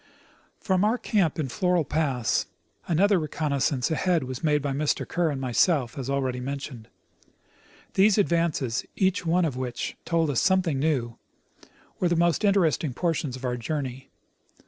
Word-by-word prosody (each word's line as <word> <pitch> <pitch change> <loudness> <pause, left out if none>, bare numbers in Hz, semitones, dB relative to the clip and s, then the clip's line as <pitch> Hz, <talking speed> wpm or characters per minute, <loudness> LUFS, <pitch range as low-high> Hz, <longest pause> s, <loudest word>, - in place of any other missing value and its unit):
From 190 -2 +1
our 220 +4 +2
camp 190 - 0
in 155 -4 -1
Floral 180 +2 +1
pass 135 -8 0 0.4
another 190 +3 +3
reconnoissance 145 -3 -1
ahead 170 0 +1
was 130 -1 -6
made 150 -2 +3
by 140 -1 -3
Mr. 145 +2 -1
Kerr 175 -2 0
and 140 -3 -3
myself, 130 0 +1
as 135 -2 -5
already 130 -2 -1
mentioned. 130 -3 -6 1.1
These 200 +2 +4
advances, 165 - +1
each 190 -2 0
one 175 +1 +3
of 140 -6 -3
which 125 -2 -4
told 165 -3 +1
us 130 - +1
something 185 -7 +2
new, 130 -6 -1 0.8
were 180 - +2
the 175 - +2
most 170 +4 +2
interesting 170 - +2
portions 160 -6 -1
of 130 0 -7
our 125 -1 -1
journey. 135 0 -4
155 Hz, 150 wpm, -26 LUFS, 130-175 Hz, 1.1 s, These